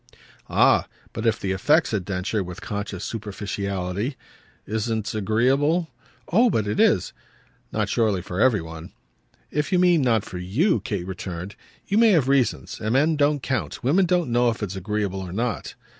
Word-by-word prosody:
"Ah -, -, +4 dB, 0.3 s
but 110 Hz, +2 st, -2 dB
if 110 Hz, -, +2 dB
the 95 Hz, -, -2 dB
effect," 95 Hz, 0 st, +3 dB
said 100 Hz, -4 st, -2 dB
Densher 95 Hz, +2 st, -2 dB
with 90 Hz, 0 st, -8 dB
conscious 100 Hz, -2 st, -5 dB
superficiality, 100 Hz, +1 st, -3 dB, 0.5 s
"isn't 110 Hz, -1 st, -2 dB
agreeable 135 Hz, -, +1 dB, 0.2 s
?" -, -, -33 dB
"Oh 235 Hz, +6 st, +5 dB
but 110 Hz, -, 0 dB
it 105 Hz, +1 st, -2 dB
is!" -, -, +3 dB, 0.6 s
"Not -, -, 0 dB
surely 105 Hz, -6 st, +1 dB
for 90 Hz, +2 st, -3 dB
every 115 Hz, -7 st, +4 dB
one." 80 Hz, 0 st, -9 dB, 0.6 s
"If 150 Hz, +4 st, -1 dB
you 185 Hz, -, +3 dB
mean 175 Hz, -3 st, +4 dB
not 115 Hz, -5 st, +2 dB
for 90 Hz, -, -7 dB
you," 115 Hz, -, +1 dB
Kate 100 Hz, -5 st, -3 dB
returned, 95 Hz, 0 st, -6 dB, 0.3 s
"you 200 Hz, +2 st, +1 dB
may 230 Hz, -3 st, +6 dB
have 150 Hz, -7 st, +3 dB
reasons 135 Hz, -3 st, +1 dB
and 110 Hz, +1 st, -1 dB
men 150 Hz, +5 st, +3 dB
don't 145 Hz, -2 st, +1 dB
count. 110 Hz, -, -3 dB
Women 175 Hz, +9 st, +3 dB
don't 175 Hz, -7 st, +1 dB
know 120 Hz, 0 st, +3 dB
if 115 Hz, -1 st, -3 dB
it's 100 Hz, -1 st, -4 dB
agreeable 100 Hz, 0 st, -2 dB
or 95 Hz, -2 st, -6 dB
not." 115 Hz, +2 st, -3 dB
110 Hz, 175 wpm, -24 LUFS, 95-135 Hz, 0.6 s, may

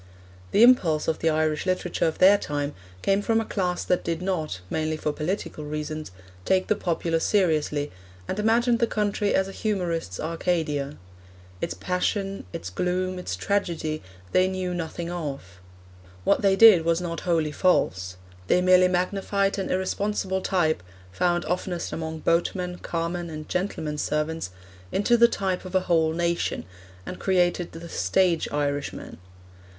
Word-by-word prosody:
The 215 Hz, -, +5 dB
impulse 175 Hz, -12 st, +5 dB
of 160 Hz, -, 0 dB
the 165 Hz, -, +2 dB
Irish 155 Hz, +1 st, 0 dB
literature 180 Hz, -2 st, 0 dB
of 160 Hz, -, -2 dB
their 200 Hz, +2 st, +7 dB
time 145 Hz, -3 st, -3 dB, 0.3 s
came 195 Hz, +1 st, +2 dB
from 225 Hz, +2 st, +2 dB
a 225 Hz, -, -2 dB
class 180 Hz, -4 st, -1 dB
that 180 Hz, -, +1 dB
did 165 Hz, -1 st, -2 dB
not 170 Hz, -, -2 dB
mainly 155 Hz, +6 st, -1 dB
for 150 Hz, -1 st, -2 dB
political 155 Hz, -1 st, -3 dB
reasons 150 Hz, +1 st, -4 dB, 0.3 s
take 185 Hz, -, +2 dB
the 215 Hz, -, +1 dB
populace 165 Hz, -2 st, -1 dB
seriously, 155 Hz, -7 st, +1 dB, 0.4 s
and 195 Hz, -, -3 dB
imagined 230 Hz, +2 st, +3 dB
the 235 Hz, -, +3 dB
country 205 Hz, -1 st, 0 dB
as 190 Hz, 0 st, +2 dB
a -, -, -7 dB
humorist's 175 Hz, -, -2 dB
Arcadia; 155 Hz, -3 st, -1 dB, 0.6 s
its 85 Hz, -, -2 dB
passion, 195 Hz, -, -2 dB
its 95 Hz, +1 st, -6 dB
gloom, 180 Hz, -, -1 dB
its 135 Hz, -, -4 dB
tragedy, 160 Hz, -, -1 dB, 0.3 s
they 185 Hz, 0 st, +4 dB
knew 185 Hz, -1 st, -2 dB
nothing 170 Hz, 0 st, -4 dB
of. 140 Hz, -, -6 dB, 0.6 s
What -, -, +3 dB
they 195 Hz, -1 st, +4 dB
did 195 Hz, -5 st, +8 dB
was 165 Hz, 0 st, +2 dB
not 170 Hz, -2 st, -4 dB
wholly 165 Hz, -4 st, 0 dB
false; 95 Hz, -, +1 dB, 0.3 s
they 180 Hz, -, +4 dB
merely 185 Hz, 0 st, +6 dB
magnified 195 Hz, +2 st, 0 dB
an 190 Hz, -, -2 dB
irresponsible 190 Hz, 0 st, -1 dB
type, 170 Hz, -, +1 dB, 0.3 s
found 175 Hz, -, +1 dB
oftenest 180 Hz, 0 st, -2 dB
among 160 Hz, -1 st, -4 dB
boatmen, 180 Hz, +1 st, 0 dB
carmen, 170 Hz, +1 st, -3 dB
and 155 Hz, -1 st, -7 dB
gentlemen's 160 Hz, -5 st, -2 dB
servants, 150 Hz, -, -1 dB, 0.4 s
into 220 Hz, +4 st, +3 dB
the 235 Hz, 0 st, +7 dB
type 190 Hz, -5 st, -2 dB
of 185 Hz, 0 st, -7 dB
a 185 Hz, -, +4 dB
whole 165 Hz, -3 st, +2 dB
nation, 170 Hz, +1 st, -1 dB, 0.4 s
and 180 Hz, -, -7 dB
created 180 Hz, -2 st, +1 dB
the 165 Hz, +1 st, -8 dB
stage 175 Hz, -1 st, +1 dB
Irishman. 145 Hz, -9 st, -3 dB
175 Hz, 150 wpm, -25 LUFS, 155-190 Hz, 0.6 s, did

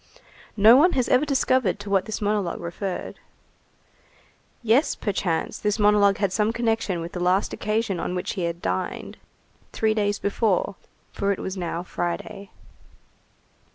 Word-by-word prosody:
No 215 Hz, +3 st, +8 dB
one 345 Hz, +6 st, +5 dB
has 255 Hz, -2 st, +1 dB
ever 255 Hz, +4 st, +4 dB
discovered 255 Hz, -7 st, +1 dB
to 205 Hz, 0 st, -8 dB
what 195 Hz, -1 st, +2 dB
this 220 Hz, -1 st, -5 dB
monologue 205 Hz, -4 st, -1 dB
referred. 180 Hz, +2 st, -5 dB, 1.4 s
Yes, 235 Hz, +7 st, +3 dB
perchance, 185 Hz, -5 st, -2 dB
this 210 Hz, 0 st, 0 dB
monologue 205 Hz, -2 st, +4 dB
had 200 Hz, -3 st, 0 dB
some 215 Hz, +2 st, +1 dB
connection 225 Hz, -6 st, -1 dB
with 170 Hz, +1 st, -6 dB
the 180 Hz, -, -5 dB
last 180 Hz, +3 st, +1 dB
occasion 215 Hz, -3 st, -1 dB
on 180 Hz, -, -3 dB
which 180 Hz, -, -3 dB
he 180 Hz, -, -2 dB
had 170 Hz, 0 st, -4 dB
dined, 90 Hz, +1 st, -3 dB, 0.5 s
three 220 Hz, -1 st, +1 dB
days 205 Hz, -1 st, 0 dB
before, 200 Hz, -1 st, 0 dB, 0.4 s
for 200 Hz, 0 st, -1 dB
it 195 Hz, -, -1 dB
was 190 Hz, -, -4 dB
now 175 Hz, -2 st, -3 dB
Friday. 180 Hz, +3 st, -5 dB
200 Hz, 150 wpm, -24 LUFS, 180-220 Hz, 1.4 s, No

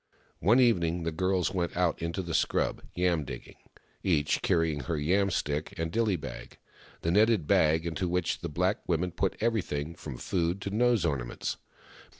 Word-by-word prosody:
One 110 Hz, -, +4 dB
evening 90 Hz, -9 st, +3 dB
the 85 Hz, -, -1 dB
girls 95 Hz, +2 st, 0 dB
went 85 Hz, -2 st, -2 dB
out 90 Hz, -2 st, +1 dB
into 85 Hz, +3 st, -2 dB
the 85 Hz, -2 st, -5 dB
scrub, -, -, +1 dB
yam 90 Hz, -3 st, +1 dB
digging, -, -, -9 dB, 0.4 s
each 75 Hz, -6 st, +1 dB
carrying 80 Hz, -4 st, +1 dB
her 80 Hz, -, -1 dB
yam 95 Hz, +7 st, +2 dB
stick 75 Hz, +1 st, -2 dB
and 80 Hz, -1 st, -2 dB
dilly 110 Hz, -2 st, +2 dB
bag 75 Hz, -, -8 dB, 0.2 s
— -, -, -24 dB
the 85 Hz, -, +1 dB
netted 105 Hz, -2 st, +4 dB
bag 80 Hz, +2 st, +3 dB
into 85 Hz, +2 st, -2 dB
which 90 Hz, -1 st, 0 dB
the 85 Hz, -, -4 dB
black 90 Hz, +6 st, 0 dB
women 90 Hz, +1 st, 0 dB
put 95 Hz, +2 st, -1 dB
everything, 85 Hz, -9 st, -1 dB
from 75 Hz, -6 st, -8 dB
food 85 Hz, +4 st, -1 dB
to 100 Hz, -, -4 dB
nose 120 Hz, -1 st, +3 dB
orna 70 Hz, -7 st, 0 dB
ments. -, -, -4 dB
85 Hz, 175 wpm, -29 LUFS, 80-95 Hz, 0.4 s, One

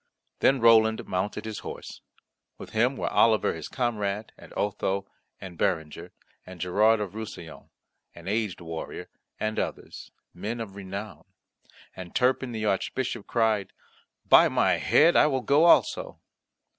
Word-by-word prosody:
Then 135 Hz, 0 st, +3 dB
Roland 110 Hz, -1 st, +4 dB
mounted 95 Hz, +4 st, -3 dB
his 110 Hz, -1 st, -5 dB
horse. -, -, -9 dB, 0.6 s
With -, -, -10 dB
him 120 Hz, +5 st, +1 dB
were -, -, -3 dB
Oliver 110 Hz, -2 st, +3 dB
his 80 Hz, -, -7 dB
comrade, 105 Hz, -4 st, -2 dB
and -, -, -15 dB
Otho 100 Hz, -1 st, -1 dB, 0.3 s
and 90 Hz, -3 st, -10 dB
Berenger, 80 Hz, -4 st, -2 dB, 0.3 s
and 95 Hz, -1 st, -12 dB
Gerard 105 Hz, +6 st, +3 dB
of 100 Hz, -3 st, -4 dB
Roussillon, 105 Hz, -7 st, -9 dB, 0.5 s
an 85 Hz, +1 st, -12 dB
aged 105 Hz, -3 st, -2 dB
warrior, 80 Hz, -1 st, -7 dB, 0.3 s
and 110 Hz, 0 st, -2 dB
others, -, -, -6 dB, 0.2 s
men 110 Hz, +7 st, -5 dB
of 110 Hz, -4 st, -6 dB
renown. 100 Hz, +2 st, -7 dB, 0.7 s
And 90 Hz, -2 st, -10 dB
Turpin 130 Hz, 0 st, +1 dB
the 110 Hz, -2 st, -3 dB
Archbishop 105 Hz, +3 st, -2 dB
cried, 110 Hz, -4 st, 0 dB, 0.5 s
"By -, -, +7 dB
my -, -, +2 dB
head, 165 Hz, +3 st, +4 dB
I -, -, +6 dB
will 135 Hz, -3 st, 0 dB
go 145 Hz, +5 st, +3 dB
also." -, -, +3 dB
110 Hz, 140 wpm, -26 LUFS, 95-115 Hz, 0.7 s, By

